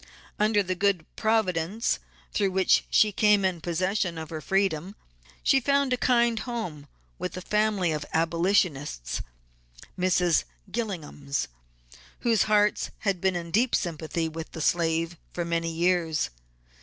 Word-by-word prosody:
Under 210 -1 +3
the 185 0 -1
good 185 -3 +1
Providence 215 -2 +1 0.3
through 200 -2 +2
which 190 0 +3
she 215 - +4
came 205 -1 +4
in 180 -3 -1
possession 180 +1 -1
of 160 -1 -7
her 155 -1 -4
freedom, 195 -1 0 0.5
she 270 - +5
found 280 0 +2
a - - +4
kind 235 -2 +3
home 215 - -5 0.3
with - - -4
a - - -4
family 210 -3 +1
of 150 -1 -2
Abolitionists, 165 - 0 0.8
(Mrs. 180 -2 +3 0.3
Gillingham's), 155 - -3 0.7
whose 230 -4 +3
hearts 210 0 +3
had 195 -4 0
been 190 -1 +2
in 170 -1 -4
deep 230 +7 +3
sympathy 165 -1 -2
with 160 0 -7
the - - -6
slave 165 +1 +1
for 175 - -3
many 165 0 -1
years. 165 - +1
180 Hz, 135 wpm, -27 LUFS, 165-210 Hz, 0.8 s, she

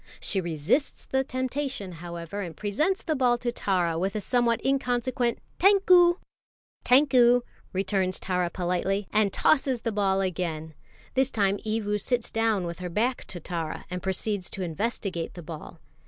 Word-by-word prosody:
She 195 - 0
resists 170 - -1
the 265 0 0
temptation, 260 -5 -3
however, 170 +3 -6
and 170 -5 -6
presents 305 - 0
the 320 - 0
ball 250 -3 +3
to 240 0 -2
Tara 180 -7 0
with 195 +4 -1
a - - 0
somewhat 235 +1 +1
inconsequent 245 -2 0 0.2
"Tankou!" 365 -3 +6 0.7
"Tankou!" 250 -2 +5 0.3
returns 190 -1 0
Tara 180 -2 0
politely, 185 +3 -1
and 210 -2 +3
tosses 265 -2 +2
the 230 - -1
ball 195 -2 +1
again. 165 -4 -3 0.4
This 265 0 +2
time 200 -4 +1
Evu 210 -2 -1
sits 245 +1 0
down 225 -4 +1
with 170 0 -5
her 180 -1 -4
back 235 +8 0
to 175 - -7
Tara, 165 -1 -4
and 180 0 -3
proceeds 190 +1 -2
to 190 - -5
investigate 180 0 -3
the 175 - -8
ball. 155 -1 -9
205 Hz, 155 wpm, -27 LUFS, 180-245 Hz, 0.7 s, Tankou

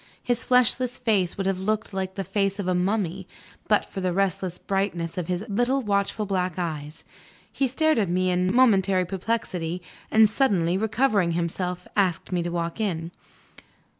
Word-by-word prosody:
His 245 -1 0
fleshless 250 0 +2
face 205 -7 +1
would 195 - -2
have 190 -1 0
looked 215 +2 -1
like 190 0 -3
the 195 - -2
face 195 +1 0
of 200 -3 -3
a 185 - +2
mummy, 190 0 -1 0.4
but 210 - +3
for 195 - -6
the 185 -1 0
restless 190 -1 -1
brightness 195 -4 -2
of 180 -3 -3
his 180 +2 -2
little 245 +6 +1
watchful 205 +1 0
black 185 -3 -1
eyes. 155 -4 -4 0.5
He 270 - 0
stared 315 +2 +2
at 200 -5 +1
me 185 +1 +1
in 180 +1 +1
momentary 195 -6 +4
perplexity, 185 -3 -2 0.3
and, 220 0 +6
suddenly 200 -8 +1
recovering 215 -3 +1
himself, 175 +1 -2
asked 190 -4 +1
me 180 -1 +1
to 170 - -2
walk 170 +2 -3
in. 170 -5 -2
190 Hz, 165 wpm, -25 LUFS, 180-215 Hz, 0.5 s, and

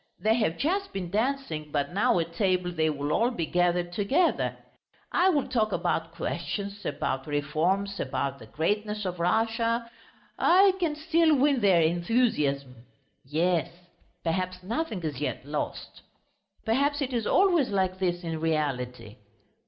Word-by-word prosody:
They 220 +1 +3
have 215 -8 0
just 390 +6 -1
been 180 -3 -4
dancing, 215 - -2
but 145 +2 -1
now 200 -1 +3
at 165 0 -2
table 180 -1 +1
they 160 -2 +1
will 145 0 -2
all 235 +2 +3
be 175 -10 -3
gathered 175 0 +1
together.... 270 - +1 0.5
I 370 - +4
will 290 -7 +1
talk 230 -4 +1
about - - -1
questions, 200 0 -4
about 135 0 -2
reforms, 165 +8 0
about 140 +1 -2
the 110 - -12
greatness 210 - -1
of 180 -1 -3
Russia.... 230 +5 +1 0.5
I 380 +2 +6
can 330 -4 0
still 320 0 +3
win 275 -1 +3
their 185 -5 +5
enthusiasm! 160 - +1 0.5
Yes! 165 +4 +1 0.5
Perhaps 185 +2 -2
nothing 220 - -3
is 150 -4 -4
yet 145 - -3
lost.... 150 +1 -5 0.6
Perhaps 280 +5 +1
it 260 -1 -4
is 230 -3 -1
always 350 -8 +3
like 190 -2 0
this 175 -1 -1
in 165 -1 -3
reality. 130 -8 -2
185 Hz, 145 wpm, -27 LUFS, 160-235 Hz, 0.6 s, I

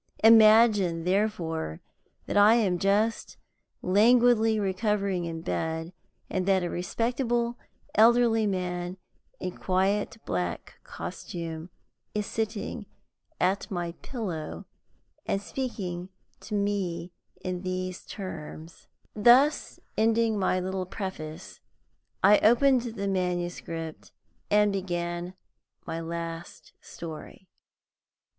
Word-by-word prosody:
Imagine, 215 -6 +6
therefore, 175 - -1 0.5
that - - -4
I 205 +2 +7
am 195 -7 +2
just 210 +4 +1 0.5
languidly 225 +2 +4
recovering 195 -2 0
in 165 -1 -5
bed, 160 +1 -3 0.3
and 185 0 -2
that 190 -2 +3
a 175 - -2
respectable 235 +5 -1 0.3
elderly 225 -1 +5
man, 180 -1 -3 0.4
in 185 -1 -4
quiet 195 +4 0
black 90 -1 -3
costume, 165 0 -6 0.5
is 210 -1 0
sitting 220 -1 -3 0.5
at 190 +4 +1
my 175 -4 -3
pillow 170 - -5 0.6
and 195 - +1
speaking 190 -4 -4 0.3
to 215 - -5
me 190 -4 -1 0.3
in 180 -1 -3
these 185 0 -4
terms 165 -4 -8
" - - -38
Thus 245 +7 +4 0.2
ending 225 -1 +2
my 185 -1 +1
little 185 0 -3
preface, 180 -4 -7 0.6
I 205 +2 +7
opened 240 0 +3
the 200 -2 -2
manuscript 175 -3 -3 0.4
and 210 -1 +4
began 175 -1 -3 0.5
my 165 - -4
last 165 0 -6
story. 170 +3 -9
190 Hz, 100 wpm, -27 LUFS, 175-220 Hz, 0.6 s, I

